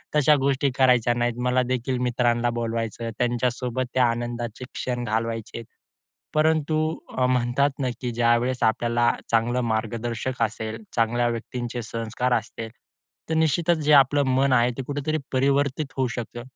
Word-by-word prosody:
तशा 150 Hz, 0 st, +5 dB
गोष्टी 140 Hz, +1 st, +2 dB
करायच्या 125 Hz, -3 st, +4 dB
नाहीत. 120 Hz, 0 st, 0 dB
मला 125 Hz, 0 st, +3 dB
देखील 130 Hz, +1 st, -1 dB
मित्रांना 120 Hz, -1 st, +1 dB
बोलवायचं. 115 Hz, 0 st, -3 dB
त्यांच्यासोबत 125 Hz, +1 st, 0 dB
त्या 130 Hz, -1 st, +4 dB
आनंदाचे 120 Hz, 0 st, -4 dB
क्षण 125 Hz, -1 st, -3 dB
घालवायचेत. 115 Hz, 0 st, -3 dB, 0.7 s
परंतु 155 Hz, 0 st, +2 dB, 0.4 s
अ, 125 Hz, -, +3 dB
म्हणतात 125 Hz, +3 st, +2 dB
ना 130 Hz, -, 0 dB
की 125 Hz, -, -2 dB
ज्यावेळेस 120 Hz, +2 st, +1 dB
आपल्याला 120 Hz, +1 st, +2 dB, 0.2 s
चांगला 115 Hz, +2 st, +2 dB
मार्गदर्शक 115 Hz, +2 st, -2 dB
असेल, 110 Hz, 0 st, -2 dB, 0.2 s
चांगल्या 120 Hz, +1 st, +2 dB
व्यक्तींचे 120 Hz, +1 st, -4 dB
संस्कार 115 Hz, +2 st, -2 dB
असतील, 115 Hz, 0 st, -4 dB, 0.6 s
तर -, -, +1 dB
निश्चितच 160 Hz, +2 st, +2 dB
जे 150 Hz, -, +4 dB
आपलं 145 Hz, +1 st, +5 dB
मन 135 Hz, +1 st, +3 dB
आहे, 120 Hz, -1 st, +4 dB
ते -, -, -1 dB
कुठेतरी 145 Hz, +2 st, -2 dB
परावर्तित 140 Hz, +2 st, +1 dB
होऊ 130 Hz, -1 st, +1 dB
शकतं. 120 Hz, 0 st, -6 dB
120 Hz, 140 wpm, -24 LUFS, 115-130 Hz, 0.7 s, तशा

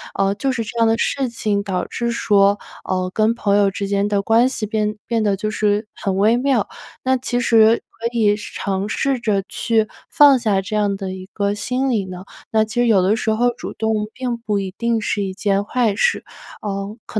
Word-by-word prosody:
呃， 195 Hz, 0 st, +1 dB
就 265 Hz, +6 st, -1 dB
是 245 Hz, -3 st, -2 dB
这 235 Hz, -, -8 dB
样 230 Hz, -, +4 dB
的 225 Hz, 0 st, +2 dB
事 270 Hz, +1 st, 0 dB
情， 210 Hz, -3 st, -1 dB
导 190 Hz, -3 st, -2 dB
致 235 Hz, 0 st, -2 dB
说， 200 Hz, -3 st, +3 dB, 0.3 s
呃， 185 Hz, -1 st, 0 dB
跟 220 Hz, +1 st, +2 dB
朋 200 Hz, -3 st, +1 dB
友 200 Hz, -1 st, +3 dB
之 200 Hz, +1 st, -4 dB
间 200 Hz, 0 st, +1 dB
的 200 Hz, -1 st, +1 dB
关 225 Hz, +4 st, +4 dB
系 240 Hz, -4 st, -3 dB
变 215 Hz, -1 st, -1 dB
变 230 Hz, -2 st, 0 dB
得 200 Hz, -2 st, +1 dB
就 215 Hz, +2 st, -2 dB
是 210 Hz, 0 st, 0 dB
很 195 Hz, -2 st, -2 dB
微 215 Hz, +4 st, +4 dB
妙。 255 Hz, -4 st, +1 dB, 0.4 s
那 260 Hz, 0 st, +2 dB
其 245 Hz, -1 st, -2 dB
实 225 Hz, -1 st, +4 dB, 0.2 s
可 230 Hz, -, -1 dB
以 210 Hz, -2 st, +3 dB
试 210 Hz, -, -9 dB
尝 195 Hz, 0 st, -2 dB
试 270 Hz, +3 st, 0 dB
着 205 Hz, -4 st, +1 dB
去 225 Hz, -2 st, +1 dB, 0.2 s
放 285 Hz, -2 st, +6 dB
下 210 Hz, -5 st, +1 dB
这 200 Hz, +3 st, -5 dB
样 205 Hz, -2 st, +1 dB
的 195 Hz, -1 st, -5 dB
一 185 Hz, 0 st, -9 dB
个 200 Hz, -1 st, 0 dB
心 255 Hz, +5 st, -1 dB
理 215 Hz, -6 st, 0 dB
呢？ 185 Hz, 0 st, -8 dB, 0.3 s
那 220 Hz, -1 st, +3 dB
其 220 Hz, +2 st, -10 dB
实 245 Hz, -, +2 dB
有 210 Hz, -5 st, +4 dB
的 190 Hz, +4 st, +2 dB
时 225 Hz, -1 st, -1 dB
候 240 Hz, +3 st, +2 dB
主 -, -, -6 dB
动 220 Hz, -1 st, -1 dB
并 250 Hz, -2 st, -3 dB
不 215 Hz, -3 st, -2 dB
一 190 Hz, -1 st, -5 dB
定 235 Hz, -1 st, 0 dB
是 205 Hz, 0 st, -1 dB
一 190 Hz, -1 st, -4 dB
件 200 Hz, 0 st, 0 dB
坏 230 Hz, -3 st, +1 dB
事。 470 Hz, -, +1 dB, 0.4 s
呃， 200 Hz, +1 st, -4 dB
可 215 Hz, -, -3 dB
215 Hz, 235 characters per minute, -20 LUFS, 200-235 Hz, 0.4 s, 放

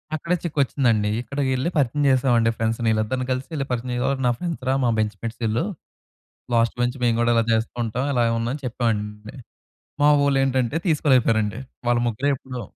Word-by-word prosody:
అక్కడే 170 Hz, +3 st, -1 dB
చిక్కు 155 Hz, -3 st, -3 dB
వచ్చిందండి. 115 Hz, -5 st, +1 dB
ఇక్కడికి 135 Hz, +3 st, -2 dB
వెళ్లి 130 Hz, +5 st, 0 dB
పరిచయం 145 Hz, +1 st, +1 dB
చేశామండి. 125 Hz, -3 st, +3 dB
ఫ్రెండ్స్‌ని 115 Hz, 0 st, 0 dB
ఈళ్ళిద్దరిని 110 Hz, +4 st, -1 dB
కలిసి 130 Hz, +1 st, -2 dB
వెళ్లి 140 Hz, -3 st, -2 dB
పరిచయం 125 Hz, +2 st, -1 dB
నా 120 Hz, -, +4 dB
ఫ్రెండ్స్ 170 Hz, -6 st, -4 dB
రా, 130 Hz, -, +3 dB
మా -, -, +3 dB
బెంచ్‌మేట్స్ 110 Hz, +2 st, -3 dB
ఈళ్ళు 110 Hz, +5 st, 0 dB, 0.9 s
లాస్ట్ 115 Hz, 0 st, +2 dB
బెంచ్ 120 Hz, +2 st, 0 dB
మేము 115 Hz, -1 st, +2 dB
కూడా 120 Hz, 0 st, +2 dB
ఇలా 115 Hz, 0 st, +3 dB
చేస్తూ 110 Hz, +1 st, 0 dB
ఉంటాం, 115 Hz, +3 st, -2 dB
ఇలా 120 Hz, -2 st, +2 dB, 0.2 s
ఉన్నాం 115 Hz, +1 st, -1 dB
అని 145 Hz, -, -8 dB
చెప్పామండి. 105 Hz, -2 st, -3 dB, 0.7 s
మా 145 Hz, -, +6 dB
వోళ్ళు 140 Hz, -1 st, +2 dB
ఏంటంటే 130 Hz, 0 st, 0 dB
తీసుకోలేక 140 Hz, -6 st, +3 dB
పోయారండి. 110 Hz, 0 st, +1 dB, 0.3 s
వాళ్ళు 120 Hz, 0 st, +3 dB
ముగ్గురే 125 Hz, +5 st, -1 dB
ఎప్పుడూ 125 Hz, -1 st, -7 dB
120 Hz, 175 wpm, -23 LUFS, 115-135 Hz, 0.9 s, మా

